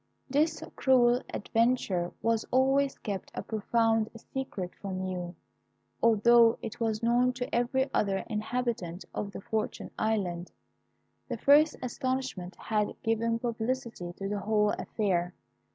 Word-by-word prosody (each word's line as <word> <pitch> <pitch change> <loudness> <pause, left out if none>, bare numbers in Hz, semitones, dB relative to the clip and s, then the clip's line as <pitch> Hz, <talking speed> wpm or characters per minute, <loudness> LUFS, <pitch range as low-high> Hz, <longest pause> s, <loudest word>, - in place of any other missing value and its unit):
"This 305 +4 +1
cruel 250 -2 +4
adventure 210 -6 +1
was 230 -1 +2
always 270 +2 +3
kept 200 -3 -5
a - - -3
profound 225 0 +1
secret 225 -6 -5
from 190 -2 -3
you, 180 -1 -4 0.7
although 230 +1 +6
it 225 - -6
was 225 -1 -1
known 245 +2 +3
to 250 0 -5
every 260 +3 +1
other 195 -2 +1
inhabitant 215 -5 -3
of 200 - -3
the - - -7
Fortunate 220 +2 -3
Island. 185 -5 -1 0.8
The - - -2
first 295 +3 +5
astonishment 255 -7 -3
had 210 -2 -1
given 230 +1 +1
publicity 230 -5 -3
to 195 +2 -5
the 205 0 -2
whole 210 0 +2
affair. 180 -4 -1
225 Hz, 125 wpm, -29 LUFS, 200-245 Hz, 0.8 s, although